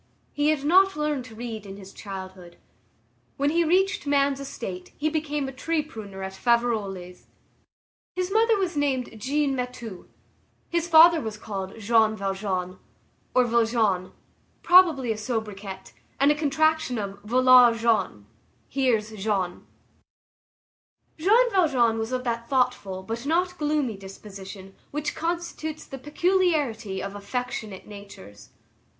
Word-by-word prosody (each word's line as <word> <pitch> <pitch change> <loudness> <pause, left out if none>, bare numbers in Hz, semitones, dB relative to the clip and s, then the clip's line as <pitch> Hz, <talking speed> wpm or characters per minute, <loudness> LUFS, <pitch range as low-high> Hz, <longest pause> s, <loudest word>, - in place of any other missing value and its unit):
He 290 +1 +1
had 305 -3 +1
not 380 +6 +5
learned 300 -4 -1
to 225 -3 -12
read 225 -2 -6
in 195 -1 -9
his 195 -1 -12
childhood. 190 -3 -9 0.8
When 285 +1 +1
he 340 +1 +3
reached 365 -1 +1
man's 280 -1 +2
estate, 190 -9 -7
he 310 +2 0
became 295 -3 -2
a - - -5
tree 310 +4 -1
pruner 205 -9 -9
at 190 0 -5
Faverolles. 200 -6 -1 0.9
His 365 +1 -2
mother 445 +1 +3
was 370 -4 -1
named 270 -5 -1
Jeanne 280 +2 0
Mathieu; 245 -6 -6 0.6
his 340 0 0
father 330 0 +7
was 220 -3 -5
called 195 -1 -6
Jean 220 0 +3
Valjean 190 -2 -3 0.6
or 255 - +5
Vlajean, 225 -5 +1 0.5
probably 330 -9 +5
a 220 - -2
sobriquet, 210 -4 -5 0.3
and 280 +2 +5
a - - +2
contraction 315 -2 +1
of 200 -1 -5
voilà 250 +1 +6
Jean, 215 - 0 0.4
"here's 240 -5 +1
Jean." 195 -4 -2 1.5
Jean 455 +8 +4
Valjean 260 - +3
was 225 +2 -3
of 255 0 -2
that 235 -1 -3
thoughtful 250 -8 0
but 230 +6 -5
not 360 +3 +1
gloomy 295 -7 0
disposition 195 0 -10 0.2
which 295 +1 -3
constitutes 330 -2 -4
the 270 - -9
peculiarity 295 - 0
of 195 0 -5
affectionate 210 -1 -5
natures. 200 - -12
245 Hz, 130 wpm, -25 LUFS, 200-300 Hz, 1.5 s, father